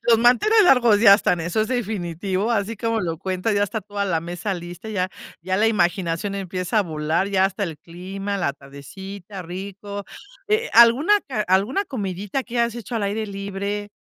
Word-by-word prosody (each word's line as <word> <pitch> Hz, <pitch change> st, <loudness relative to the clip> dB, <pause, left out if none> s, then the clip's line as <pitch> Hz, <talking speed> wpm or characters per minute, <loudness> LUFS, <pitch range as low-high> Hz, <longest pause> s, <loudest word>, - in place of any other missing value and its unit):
Los 230 Hz, -2 st, +5 dB
manteles 335 Hz, -, +5 dB
largos 240 Hz, -, +5 dB
ya 200 Hz, -3 st, +9 dB
están, 180 Hz, -4 st, +1 dB
eso 175 Hz, +6 st, -1 dB
es -, -, -2 dB
definitivo, 200 Hz, -3 st, -2 dB
así 220 Hz, +1 st, -1 dB
como 225 Hz, +1 st, -1 dB
lo 165 Hz, -4 st, -3 dB
cuenta, 185 Hz, +4 st, -1 dB
ya 205 Hz, 0 st, +2 dB
está 220 Hz, +2 st, -4 dB
toda 205 Hz, 0 st, -4 dB
la 170 Hz, -5 st, 0 dB
mesa 175 Hz, +4 st, -4 dB
lista. 175 Hz, +4 st, -8 dB
Ya 185 Hz, -4 st, -1 dB, 0.3 s
ya 185 Hz, +2 st, -1 dB
la 215 Hz, +3 st, +3 dB
imaginación 190 Hz, -2 st, 0 dB
empieza 185 Hz, +2 st, -2 dB
a -, -, +4 dB
volar 160 Hz, +2 st, -1 dB
ya 190 Hz, -1 st, +2 dB
hasta 195 Hz, +1 st, -1 dB
el 165 Hz, -4 st, -6 dB
clima, 190 Hz, +5 st, -6 dB
la 175 Hz, -6 st, 0 dB
tardecita, 185 Hz, +8 st, -10 dB
rico, 200 Hz, +3 st, -7 dB, 0.4 s
eh, 435 Hz, +3 st, 0 dB
alguna 240 Hz, -, +6 dB
ca 255 Hz, -6 st, -2 dB
alguna 205 Hz, -, +2 dB
comidita 205 Hz, -, -4 dB
que 235 Hz, 0 st, -2 dB
has 235 Hz, 0 st, 0 dB
hecho 235 Hz, 0 st, -7 dB
al 225 Hz, -, -1 dB
aire 210 Hz, +2 st, -1 dB
libre 200 Hz, +1 st, -4 dB
200 Hz, 185 wpm, -22 LUFS, 180-220 Hz, 0.4 s, ya